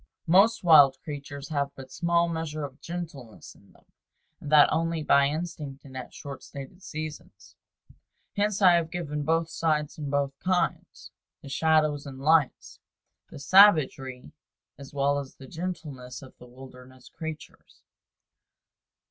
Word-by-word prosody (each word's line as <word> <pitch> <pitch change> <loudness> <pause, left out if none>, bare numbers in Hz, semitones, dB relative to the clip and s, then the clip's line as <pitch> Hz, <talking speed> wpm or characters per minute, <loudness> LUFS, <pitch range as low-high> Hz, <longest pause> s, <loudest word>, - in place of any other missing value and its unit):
Most 195 +7 +4
wild 145 -6 +7
creatures 145 -1 -8
have 140 -2 -1
but 130 -1 -11
small 170 +4 +1
measure 160 -2 -4
of 140 0 -8
gentleness 160 -10 -8
in - - -23
them, - - -25 0.5
and 145 - -8
that 150 -1 +7
only 165 -1 -1
by 140 -1 +4
instinct 150 -3 -6
and 130 -1 -13
at 130 - -7
short 140 -2 -9
stated 140 +7 -10
seasons. 155 -3 -9 0.8
Hence 205 -1 0
I 185 - +8
have 170 -2 +1
given 150 -4 -4
both 165 +2 0
sides 155 -2 -1
and 145 -2 -4
both 140 -1 -1
kinds, 185 -1 -2 0.3
the 140 - -9
shadows 155 -1 +1
and 135 -1 -9
lights, 155 0 +1 0.5
the - - -11
savagery 140 -6 +4 0.4
as 140 -1 -12
well 145 0 +1
as 140 -2 -9
the 135 - -13
gentleness 145 -7 -7
of 130 - -14
the 125 - -13
wilderness 125 0 -14
creatures. 160 -1 -10
150 Hz, 140 wpm, -27 LUFS, 135-165 Hz, 0.8 s, I